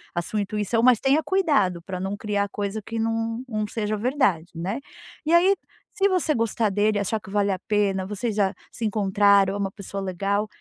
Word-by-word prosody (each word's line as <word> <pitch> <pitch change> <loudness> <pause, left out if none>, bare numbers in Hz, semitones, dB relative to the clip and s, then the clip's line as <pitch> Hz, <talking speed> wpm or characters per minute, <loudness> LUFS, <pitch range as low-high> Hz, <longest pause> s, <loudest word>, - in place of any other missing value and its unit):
a 175 - +1
sua 210 +5 -3
intuição, 210 +2 -1
mas 245 -3 +6
tenha 275 +4 +3
cuidado 285 - +2
pra 185 +1 -6
não 195 +2 -3
criar 205 -1 -1
coisa 205 +1 -3
que 225 +3 -6
não 225 +1 -1
não 215 -3 -2
seja 215 -1 -2
verdade, 210 - +1
né. 185 +9 -3 0.5
E 320 - +1
aí 365 +3 +6 0.4
se 395 -1 +3
você 365 -5 +1
gostar 230 -3 0
dele, 205 +2 +1
achar 210 +2 -1
que 195 - -13
vale 200 0 +1
a 190 - -2
pena, 200 -3 +1
vocês 210 +3 -2
já 195 -2 +2 0.2
se 230 - -4
encontraram, 200 -1 +3
é - - -2
uma 200 -1 -1
pessoa 200 0 -6
legal, 195 +3 -1
210 Hz, 200 wpm, -24 LUFS, 195-230 Hz, 0.5 s, mas